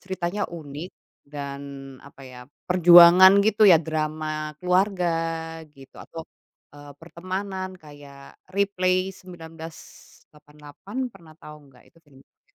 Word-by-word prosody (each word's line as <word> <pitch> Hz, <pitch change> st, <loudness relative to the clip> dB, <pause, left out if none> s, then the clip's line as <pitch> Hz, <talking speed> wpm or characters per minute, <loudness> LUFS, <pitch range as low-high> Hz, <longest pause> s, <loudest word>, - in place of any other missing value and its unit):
ceritanya 190 Hz, +1 st, -4 dB
unik 160 Hz, +1 st, -9 dB, 0.4 s
dan 140 Hz, -1 st, -8 dB, 0.5 s
apa 140 Hz, -, -17 dB
ya, 130 Hz, -1 st, -12 dB, 0.3 s
perjuangan 175 Hz, +1 st, +8 dB
gitu 215 Hz, 0 st, +3 dB
ya 175 Hz, -5 st, +7 dB
drama 155 Hz, -1 st, -4 dB
keluarga 180 Hz, -1 st, +1 dB, 0.6 s
gitu 135 Hz, -2 st, -17 dB
atau, 165 Hz, -, -10 dB, 0.5 s
eee, 145 Hz, 0 st, -13 dB
pertemanan 185 Hz, +3 st, -6 dB
kayak 145 Hz, -4 st, -15 dB, 0.2 s
Replay 185 Hz, -2 st, 0 dB
1988, 160 Hz, -, -11 dB
pernah 165 Hz, -6 st, -18 dB
tahu 150 Hz, -1 st, -13 dB
enggak? 130 Hz, -2 st, -22 dB
Itu -, -, -26 dB
film 135 Hz, -3 st, -21 dB
Korea -, -, -45 dB
165 Hz, 110 wpm, -23 LUFS, 150-185 Hz, 0.6 s, perjuangan